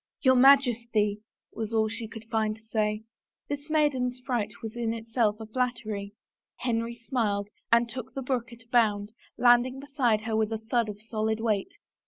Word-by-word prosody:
" - - -59
Your 260 -2 +6
Majesty 235 -6 +4
I - - -37 0.2
" - - -44
was 220 0 -2
all 220 0 +3
she 225 +1 -5
could 225 0 -10
find 220 -1 0
to 220 - -19
say. 215 -1 0 0.5
This 290 +1 -4
maiden 290 -5 +2
fright 235 -6 -1
was 220 0 -5
in 230 -1 -1
itself 225 -1 0
a 220 - -6
flattery. 220 -4 -2 0.4
Henry 235 -1 -1
smiled 220 -4 -1 0.2
and 235 +1 +5
took 250 +1 -7
the 270 - -3
brook 245 -2 -2
at 235 -1 -13
a 230 - -33
bound, 210 -4 +2 0.3
landing 245 +2 +4
beside 270 -6 +1
her 220 0 -2
with 220 0 +1
a 225 - -1
thud 225 +1 0
of 205 -1 -7
solid 220 0 -2
weight. 215 -4 -1
230 Hz, 190 wpm, -28 LUFS, 215-245 Hz, 0.5 s, Your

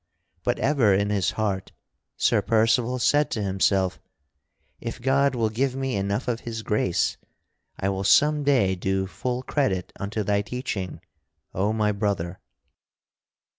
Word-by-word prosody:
But - - 0
ever 130 -9 +3
in 100 +1 +1
his 100 -3 +1
heart 100 -4 -2 0.4
Sir - - +3
Percival 115 +2 +2
said 145 +4 +3
to 110 - -2
himself: 95 -1 +1 0.8
"If 115 - -6
God 135 +2 +2
will 115 -3 0
give 130 +3 0
me 135 -2 -2
enough 100 +4 -1
of 120 -2 -1
His 115 -2 -6
grace, 100 -5 0 0.6
I 95 - -1
will 95 0 -2
some 150 +8 +4
day 125 -10 +3
do 95 +1 -1
full 125 +6 -3
credit 100 - -1
unto 105 +2 -2
thy 100 0 +1
teaching, 105 -5 -4 0.5
O 100 +3 +1
my 105 -1 +1
brother!" 100 -4 -2
110 Hz, 140 wpm, -25 LUFS, 95-125 Hz, 0.8 s, some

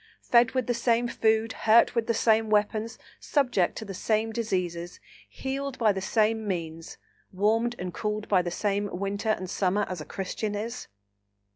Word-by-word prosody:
fed 235 0 +4
with 255 -2 0
the 245 - 0
same 235 0 +1
food, 220 -1 +1
hurt 225 +1 +4
with 230 -2 0
the 230 - +2
same 220 -1 +3
weapons, 215 +1 0 0.2
subject 245 - +1
to 220 - -6
the 195 - -6
same 220 +3 0
diseases, 180 -7 -3 0.3
healed 275 0 -4
by 220 -3 +4
the 190 -1 -3
same 220 +1 +1
means, 165 -3 -4 0.3
warmed 225 +5 +1
and 180 -1 -5
cooled 210 +2 -3
by 190 -3 +4
the 175 - -3
same 205 +3 -1
winter 200 +3 -2
and 190 -4 0
summer, 195 +2 0
as 180 -4 -5
a - - -7
Christian 205 +2 -4
is? 230 +4 -5
215 Hz, 170 wpm, -27 LUFS, 195-230 Hz, 0.3 s, fed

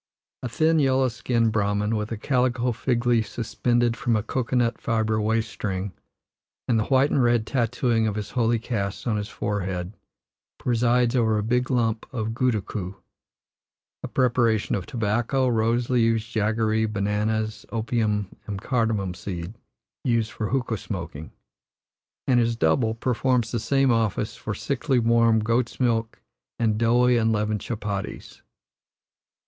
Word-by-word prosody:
A 125 - -4
thin, 160 +6 +2
yellow 130 -2 +3
skinned 115 -1 0
Brahman, 105 0 0
with 105 +1 -3
a 115 - -2
calico 125 0 +1
fig 120 +1 -1
leaf 115 -3 +3
suspended 120 +1 0
from 120 -1 0
a 105 - 0
cocoa 125 +2 -2
nut 120 -1 +1
fibre 110 -1 0
waist 110 +1 0
string, 95 -1 -3 0.8
and 115 -2 +2
the 110 - 0
white 135 +1 +3
and 135 - +3
red 120 -2 +3
tattooing 120 -2 +1
of 105 - -2
his 105 -1 -5
holy 120 -1 +2
caste 105 -4 -3
on 110 -3 0
his 105 0 -3
forehead, 95 -3 -3 0.6
presides 120 0 +2
over 110 -3 +2
a 105 - -1
big 125 +3 0
lump 115 -3 0
of 115 -2 -3
goodakoo 105 -6 -1 1.1
(a - - -4
preparation 120 -4 +1
of 95 -3 -2
tobacco, 120 +4 0
rose 115 0 +1
leaves, 115 -3 +2
jaggeree, 110 0 0
bananas, 105 +1 -1
opium, 110 -3 -1
and 100 -2 -4
cardamom 110 -5 0
seed, 90 +1 -6 0.5
used 115 -2 +1
for 110 - -3
hookah 120 -3 -1
smoking), 85 -6 -6 0.9
and 125 -2 +3
his 115 0 +1
double 110 +4 +2
performs 125 -1 0
the 120 - -1
same 135 +4 +2
office 110 -1 0
for 105 - -5
sickly, 135 +3 -1
warm 115 -1 +4
goats' 115 +2 0
milk 115 -3 0 0.3
and 110 -2 +1
doughy, 120 +2 +4
unleavened 110 -2 +1
chup 115 -3 -5
patties. 100 -2 -5
115 Hz, 145 wpm, -25 LUFS, 105-120 Hz, 1.1 s, warm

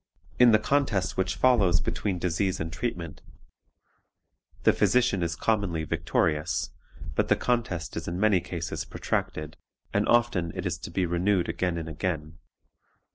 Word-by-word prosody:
In 125 -1 +8
the 110 - +7
contest 110 -6 0
which 95 0 0
follows 100 -10 +4
between 95 -3 -2
disease 90 +2 -1
and 80 0 -3
the - - -8
treatment, 85 -5 -4 1.4
the - - +5
physician 125 -6 +2
is 85 0 -1
commonly 100 -6 0
victorious, 80 -1 0 0.4
but - - +1
the - - +4
contest 115 -9 -1
is 85 - -4
in 85 +2 -3
many 105 -2 +4
cases 85 -1 -4
protracted, 75 0 -3 0.4
and - - +1
often 115 -9 +2
it - - -4
is - - -2
to - - -7
be 95 - 0
renewed 90 +2 +1
again 90 -2 -1
and 80 -1 -4
again. 80 0 -4
90 Hz, 150 wpm, -27 LUFS, 85-105 Hz, 1.4 s, In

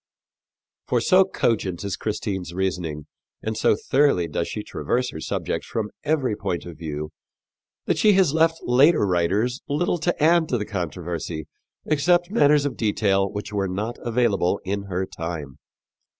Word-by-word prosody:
For - - +2
so 185 0 +5
cogent 100 - -1
is 100 -2 -2
Christine's 95 -5 -3
reasoning 90 -6 -2 0.4
and 110 0 -2
so 110 - +3
thoroughly 130 -6 +2
does 75 - -2
she - - -5
traverse 125 - -1
her 80 - -7
subject - - -3
from 110 -2 -3
every 145 -7 +1
point 95 -4 -3
of 85 -3 -10
view 75 -2 -5 0.7
that - - 0
she 210 -1 +5
has 185 -6 +3
left 165 0 +3
later 135 +2 +4
writers 100 +8 +1
little 175 +4 0
to 165 -1 -1
add 165 0 +4
to 125 - +1
the 105 - -3
controversy 85 -4 -4 0.4
except 175 +4 +2
matters 145 -8 +4
of 135 -5 -3
detail 100 -3 +1
which 105 0 -6
were 100 -1 0
not 105 +6 -3
available 110 -6 +1
in 100 +1 -2
her 95 -1 -2
time. 80 -6 -6
105 Hz, 155 wpm, -24 LUFS, 90-145 Hz, 0.7 s, so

